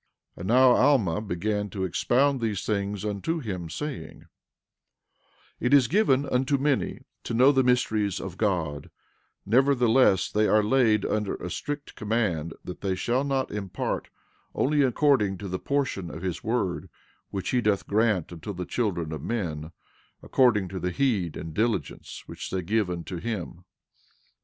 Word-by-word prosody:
12:9 - - -34
And 90 - -6
now 125 +3 +6
Alma 120 - +3
began 105 +1 -2
to 95 0 -4
expound 130 - +1
these 110 -4 -2
things 100 -1 -2
unto 105 - -2
him, 95 - -5
saying: 85 - -6 1.4
It 125 +4 +4
is 135 -4 +5
given 145 - +3
unto 135 +2 +1
many 140 0 0 0.2
to 115 - -3
know 130 +4 +6
the 135 -2 +3
mysteries 110 -6 +1
of 95 -2 -6
God; 85 -9 -1 0.6
nevertheless 125 -3 +3
they 105 0 +2
are 105 0 +4
laid 110 -3 +3
under 105 -2 -1
a 90 - -6
strict 145 +8 -5
command 105 -8 -1
that 90 - -8
they 95 -2 -1
shall 125 +7 0
not 135 -2 -1
impart 100 -3 -3 0.5
only 145 +2 +2
according 130 -7 +2
to 100 - -7
the 95 0 -3
portion 135 -11 -1
of 85 - -8
his 90 -2 -3
word 95 -6 -1 0.4
which 95 -2 -3
he 125 - +2
doth 105 -3 +1
grant 105 -5 +1
unto 95 +5 -6
the 90 -1 -5
children 90 -10 -2
of 80 -3 -5
men, 80 -6 -3 0.5
according 115 -7 +3
to 95 +1 -5
the 90 - -1
heed 100 - 0
and 80 - -7
diligence 105 - -2
which - - -7
they 95 -1 -2
give 105 +2 0
unto 90 +1 -5
him. 90 -3 -5
105 Hz, 155 wpm, -26 LUFS, 90-125 Hz, 1.4 s, now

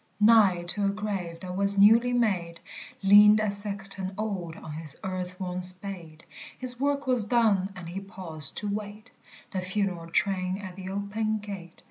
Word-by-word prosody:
Nigh 210 -5 +5
to 200 +4 -1
a - - +3
grave 200 -5 -4
that 180 -1 -6
was 200 +1 +1
newly 225 +5 +6
made, 185 -9 0 0.4
Leaned 210 +2 +7
a 215 -1 0
sexton 195 -2 -4
old 190 -6 -4
on 155 - -10
his 155 -2 -6
earth 185 -1 -5
worn 180 -1 -3
spade; 180 -3 -4 0.3
His 250 -1 -2
work 285 +1 0
was 250 -5 +3
done, 205 -5 +2
and 180 -2 -9
he 180 +3 -5
paused 175 -7 +1
to 210 - -3
wait 210 +2 -6 0.4
The 190 -4 -2
funeral 185 -3 -2
train 185 +1 0
at 190 -3 -8
the 190 0 -7
open 205 +2 -2
gate. 195 -5 -9
195 Hz, 165 wpm, -27 LUFS, 180-210 Hz, 0.4 s, Leaned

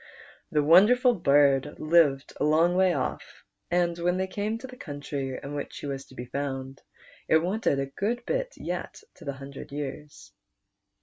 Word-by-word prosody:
The 150 -1 +2
wonderful 225 - +6
bird 145 - +3
lived 155 -4 +3
a - - 0
long 160 +4 +3
way 185 0 +4
off, - - -4 0.3
and 175 -1 +1
when 175 +1 +1
they 190 - 0
came 205 +3 -3
to 235 - -9
the 255 -1 -10
countr}' 145 - -5
in 140 - -6
which 145 -1 -5
he - - -7
was 135 -1 -4
to 130 - -17
be 120 - -6
found, 135 +1 -4 0.5
it 160 - +5
wanted 180 -2 0
a 135 - 0
good 220 - -3
bit - - -2
yet - - -5
to 170 - -15
the 140 - -3
hundred 135 0 -10
years. 145 +1 -7
155 Hz, 175 wpm, -27 LUFS, 140-185 Hz, 0.5 s, wonderful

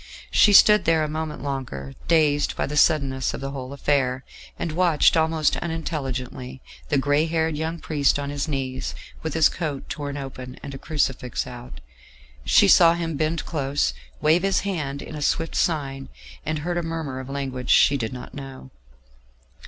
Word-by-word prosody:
She 210 - +5
stood 210 0 +7
there 160 -1 +3
a - - -1
moment 155 -3 -4
longer, 125 - -5
dazed 150 -3 +2
by - - -1
the 150 - -5
suddenness 135 -4 +2
of - - -8
the 135 0 -4
whole 130 -1 -6
affair, 135 -2 0 0.3
and 165 - -3
watched 170 -2 +3
almost 160 -1 +2
unintelligently 135 -6 -4 0.3
the 145 - +2
grey 145 +3 +2
haired 160 -1 0
young 160 +2 -3
priest 145 -4 +1
on 140 0 -4
his 145 +2 -2
knees, 130 -3 -3 0.3
with 160 -1 -4
his 160 -2 +6
coat 150 -5 -4
torn 145 -1 -4
open, 130 -2 -7
and 140 - -7
a 135 - -7
crucifix 135 -5 -1
out; 120 - -10 0.6
she - - +5
saw 170 0 +7
him 165 -2 -3
bend 155 +2 -1
close, 140 - -1 0.3
wave 160 +3 +4
his 195 0 +1
hand 150 -8 -3
in - - -9
a 150 - -6
swift 165 +2 0
sign, 135 -5 -1 0.3
and 155 +1 -2
heard 175 0 -1
a - - -1
murmur 160 -5 -4
of 130 0 -8
a - - -5
language 130 -2 -4
she 140 - +6
did 115 -5 -2
not 125 -1 -9
know. 135 -2 -9
145 Hz, 175 wpm, -24 LUFS, 135-160 Hz, 0.6 s, stood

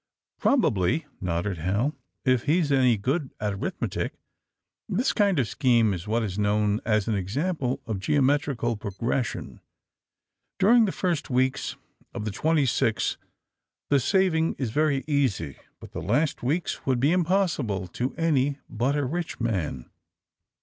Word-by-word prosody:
'' - - -59
"Probably," 145 - +2 0.2
nodded 90 +1 -2
Hal, 100 - 0 0.3
"if 130 -3 +2
he's 155 0 +2
any 130 -4 +4
good 135 +7 -1
at 105 -1 -1
arithmetic. 100 - -3 0.8
This 250 +4 +1
kind 200 -5 +2
of 130 -5 +2
scheme 115 -6 +3
is 90 +2 -6
what 115 +2 +1
is 100 -2 -3
known 105 +1 +1
as 110 -3 +1
an 110 - +1
example 130 - -2
in 110 -5 -3
geometrical 135 -1 +1
progres 115 +5 -1
sion. - - -8 1.0
During 225 +4 +5
the 195 - -1
first 175 -6 -1
weeks 130 +1 0 0.4
of 105 - -4
the 105 - -2
twenty 155 +6 +2
six 115 -2 +1 0.7
the 140 - +5
saving 165 - +2
is 125 -5 -2
very 145 0 +1
easy. 130 - 0 0.2
But - - -12
the - - -5
last 125 - 0
weeks 150 +8 -1
would 130 -2 +1
be 140 +5 +3
impossible 170 - +1
to 125 +8 -3
any 145 -4 +1
but 125 +6 0
a 145 -2 0
rich 165 +5 -3
man. 90 - -2
130 Hz, 150 wpm, -26 LUFS, 105-155 Hz, 1.0 s, During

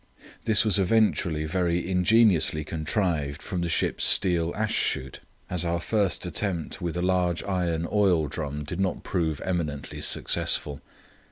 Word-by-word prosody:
This 110 -1 +3
was 105 -2 +3
eventually 90 -6 +1
very 85 +1 -1
ingeniously 90 -4 +3
contrived 80 -2 -2
from 90 -2 -3
the 85 - -2
ship's 80 - 0
steel 85 -2 +3
ash 110 0 -1
shoot, 65 0 -1 0.3
as 90 -1 -1
our 85 0 -1
first 100 +1 0
attempt 90 0 -3
with 85 -1 -3
a 90 - -1
large 90 -2 +1
iron 85 -4 -1
oil 95 -7 +2
drum 75 0 -5
did 85 +5 -6
not 95 -1 -1
prove 80 -6 -2
eminently 80 -6 -3
successful. 70 -2 0
85 Hz, 145 wpm, -26 LUFS, 80-95 Hz, 0.3 s, This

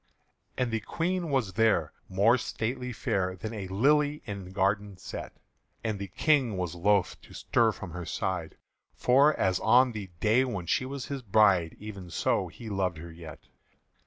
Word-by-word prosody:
And 125 -2 0
the 115 - 0
Queen 175 - -2
was 130 -9 0
there, 110 -9 +2 0.2
more 100 +6 +4
stately 125 +1 -3
fair 95 -4 -1
Than 110 +5 -6
a 100 -4 -5
lily 145 +9 +2
in 100 -4 -6
garden 100 0 0
set; - - -7 0.5
And 110 -3 -2
the 100 - -4
King 130 - +2
was 90 -2 -2
loth 95 +2 +1
to - - -15
stir 115 -2 +2
from 95 -4 -8
her 90 0 -6
side; 95 -6 -3 0.4
For 140 +4 +4
as 95 -1 +2
on 125 +1 +5
the 105 -4 -6
day 110 +7 +4
when 100 -9 -3
she 130 +10 0
was 135 -1 -5
his 140 -2 -5
bride, 95 -6 +3
Even 100 -4 -8
so 85 - 0
he 115 - -11
loved 95 -5 -1
her 85 +2 -9
yet. 80 -2 -10
105 Hz, 170 wpm, -29 LUFS, 95-125 Hz, 0.5 s, on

